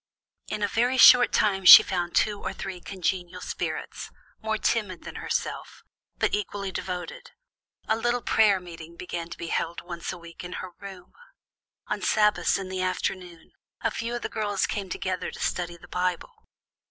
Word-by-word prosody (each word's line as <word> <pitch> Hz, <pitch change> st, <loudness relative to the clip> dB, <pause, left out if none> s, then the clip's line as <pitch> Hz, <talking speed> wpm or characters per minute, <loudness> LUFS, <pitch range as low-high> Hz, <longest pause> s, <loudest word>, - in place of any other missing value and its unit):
"In 215 Hz, -1 st, -3 dB
a -, -, +3 dB
very 245 Hz, +5 st, +1 dB
short 250 Hz, -1 st, +8 dB
time 195 Hz, -2 st, +1 dB
she 180 Hz, -, +12 dB
found 175 Hz, -2 st, -3 dB
two 205 Hz, -1 st, +1 dB
or -, -, -4 dB
three 185 Hz, -2 st, -7 dB
congenial 180 Hz, -2 st, -3 dB
spirits, -, -, -5 dB, 0.3 s
more 220 Hz, 0 st, -1 dB
timid 210 Hz, -6 st, -1 dB
than -, -, -8 dB
herself, -, -, -4 dB, 0.3 s
but -, -, 0 dB
equally 200 Hz, -1 st, -3 dB
devoted. 180 Hz, -2 st, -6 dB, 0.6 s
A 220 Hz, -, +2 dB
little 240 Hz, +1 st, -1 dB
prayer 205 Hz, -3 st, +4 dB
meeting 170 Hz, -2 st, -11 dB
began 170 Hz, -1 st, -6 dB
to 170 Hz, -, -8 dB
be 170 Hz, -, -6 dB
held 170 Hz, +1 st, -2 dB
once 170 Hz, -1 st, -6 dB
a 185 Hz, -, -7 dB
week 170 Hz, 0 st, -11 dB
in 180 Hz, +1 st, -7 dB
her 185 Hz, -, -6 dB
room. 190 Hz, -2 st, -11 dB, 0.7 s
On 210 Hz, -1 st, -3 dB
Sabbaths 210 Hz, +2 st, +2 dB
in 190 Hz, -1 st, -6 dB
the 185 Hz, 0 st, -3 dB
afternoon, 180 Hz, -2 st, -4 dB, 0.3 s
a -, -, 0 dB
few 235 Hz, +1 st, -4 dB
of 240 Hz, -, -5 dB
the -, -, -1 dB
girls 205 Hz, -2 st, -1 dB
came 200 Hz, -3 st, -4 dB
together 185 Hz, 0 st, -3 dB
to -, -, -11 dB
study 175 Hz, -1 st, -2 dB
the -, -, -16 dB
Bible. 180 Hz, -1 st, -3 dB
185 Hz, 175 wpm, -26 LUFS, 175-210 Hz, 0.7 s, she